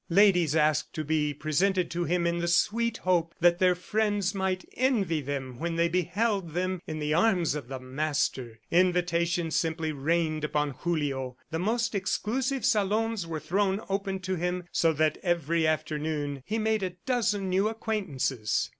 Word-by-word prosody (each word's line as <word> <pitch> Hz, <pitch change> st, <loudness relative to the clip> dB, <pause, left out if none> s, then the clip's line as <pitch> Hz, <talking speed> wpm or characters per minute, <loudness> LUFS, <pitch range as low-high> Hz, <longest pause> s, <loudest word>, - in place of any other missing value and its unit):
Ladies 180 Hz, -4 st, +4 dB
asked 155 Hz, -1 st, +2 dB
to 155 Hz, -, -2 dB
be 150 Hz, 0 st, 0 dB
presented 175 Hz, +6 st, 0 dB
to 175 Hz, 0 st, -1 dB
him 175 Hz, +2 st, +1 dB
in 170 Hz, 0 st, 0 dB
the 170 Hz, -, -1 dB
sweet 230 Hz, +6 st, +2 dB
hope 170 Hz, -2 st, 0 dB
that 175 Hz, 0 st, +4 dB
their 180 Hz, -1 st, +4 dB
friends 205 Hz, +1 st, 0 dB
might 190 Hz, -1 st, -1 dB
envy 205 Hz, -, +1 dB
them 135 Hz, -3 st, -5 dB
when 170 Hz, 0 st, -2 dB
they 170 Hz, 0 st, +3 dB
beheld 185 Hz, +1 st, 0 dB
them 185 Hz, 0 st, -1 dB
in 155 Hz, -, -4 dB
the 150 Hz, 0 st, -1 dB
arms 175 Hz, -3 st, +3 dB
of 150 Hz, -5 st, -5 dB
the 130 Hz, 0 st, -5 dB
master. 130 Hz, -3 st, -2 dB
Invitations 170 Hz, -2 st, +2 dB
simply 160 Hz, -1 st, 0 dB
rained 155 Hz, +2 st, 0 dB
upon 150 Hz, -1 st, 0 dB
Julio. 135 Hz, -4 st, -2 dB
The 160 Hz, -, -2 dB
most 230 Hz, +5 st, 0 dB
exclusive 235 Hz, +7 st, -1 dB
salons 215 Hz, -2 st, +1 dB
were 160 Hz, -1 st, -3 dB
thrown 195 Hz, +4 st, 0 dB
open 195 Hz, 0 st, -1 dB
to 185 Hz, 0 st, -2 dB
him 180 Hz, +1 st, -2 dB
so 165 Hz, -, +3 dB
that 155 Hz, 0 st, +1 dB
every 170 Hz, -2 st, +1 dB
afternoon 150 Hz, -2 st, -2 dB
he 220 Hz, -, -1 dB
made 220 Hz, -1 st, +1 dB
a 185 Hz, -2 st, -3 dB
dozen 215 Hz, -6 st, 0 dB
new 190 Hz, +3 st, +2 dB
acquaintances. 170 Hz, -, -1 dB
175 Hz, 165 wpm, -28 LUFS, 155-195 Hz, -, Ladies